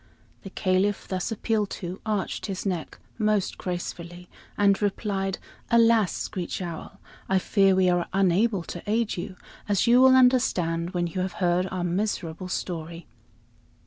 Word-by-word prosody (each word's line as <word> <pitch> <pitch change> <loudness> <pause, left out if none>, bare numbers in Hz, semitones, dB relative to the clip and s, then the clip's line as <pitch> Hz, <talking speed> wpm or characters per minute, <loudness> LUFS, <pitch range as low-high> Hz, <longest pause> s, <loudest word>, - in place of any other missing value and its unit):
The 195 - -9
Caliph, 190 +1 0
thus 185 +3 -3
appealed 215 -1 0
to, 180 +1 -6
arched 210 -1 -2
his 195 -1 -4
neck 180 -5 -3 0.2
most 210 -3 0
gracefully 175 0 -6 0.3
and 200 0 +3
replied: 195 -1 -1 0.3
"Alas! 230 -4 +4
Screech 180 -3 -4
Owl, 170 -3 -7 0.3
I 190 - +3
fear 195 0 +3
we 185 -1 +3
are 175 -1 +1
unable 195 +1 +2
to 175 +1 -7
aid 225 0 +1
you, 185 +2 -6 0.3
as 200 -3 +2
you 245 +1 +6
will 260 0 +7
understand 185 -10 +2
when 175 0 +1
you 175 +2 -3
have 185 0 -3
heard 180 0 +1
our 185 -2 -3
miserable 180 -1 -2
story." 170 -2 -5
190 Hz, 145 wpm, -26 LUFS, 175-210 Hz, 0.3 s, will